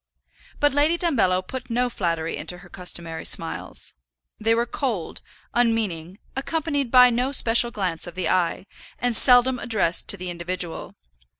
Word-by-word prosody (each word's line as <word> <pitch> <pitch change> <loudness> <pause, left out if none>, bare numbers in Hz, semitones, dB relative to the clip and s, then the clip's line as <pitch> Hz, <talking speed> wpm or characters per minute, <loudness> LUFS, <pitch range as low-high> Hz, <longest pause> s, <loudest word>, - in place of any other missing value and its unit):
But 290 -1 +3
Lady 300 +4 +3
Dumbello 190 - +1
put 255 +2 -7
no 245 +2 +1
flattery 165 -7 -2
into 180 - -4
her 175 0 -15
customary 170 -3 -5
smiles. - - -2 0.5
They 225 +1 +2
were 235 +1 +1
cold, 235 - -3 0.3
unmeaning, 210 -7 0 0.2
accompanied 285 -1 -2
by 250 0 +7
no 250 +3 0
special 240 -3 +4
glance 185 -7 -2
of 175 - -9
the 185 - -2
eye, 180 0 0 0.3
and 245 -1 -1
seldom 250 +1 +6
addressed 205 -8 +1
to 200 - +2
the 180 -1 -5
individual. 175 0 -5
225 Hz, 145 wpm, -23 LUFS, 180-250 Hz, 0.5 s, by